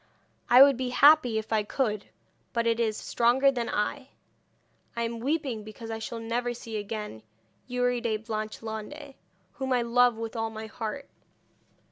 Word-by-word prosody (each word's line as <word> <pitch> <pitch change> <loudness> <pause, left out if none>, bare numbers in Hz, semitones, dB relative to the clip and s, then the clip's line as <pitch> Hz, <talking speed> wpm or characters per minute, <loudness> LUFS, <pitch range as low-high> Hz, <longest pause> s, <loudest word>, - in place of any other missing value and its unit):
I 250 +2 +10
would 275 -2 +4
be 255 -1 -2
happy 265 -3 +6
if 220 +1 -3
I 215 - +3
could, 210 -1 -2 0.5
but 235 -2 0
it 230 0 +1
is 220 -2 0
stronger 255 +4 +3
than 240 -3 -3
I. 260 +6 -2 0.9
I 235 - -1
am 230 0 -3
weeping 265 -4 -1
because 220 +2 -9
I 225 - -4
shall 225 +1 -5
never 240 +2 -2
see 230 -1 -8
again 210 - -5 0.5
Youri 245 -1 0
de 225 -2 0
Blanchelande, 220 +5 -6 0.4
whom 265 -1 -4
I 245 -1 +3
love 240 0 +3
with 225 +1 -5
all 225 -1 -1
my 220 0 -7
heart. 220 +5 -6
235 Hz, 160 wpm, -28 LUFS, 220-250 Hz, 0.9 s, I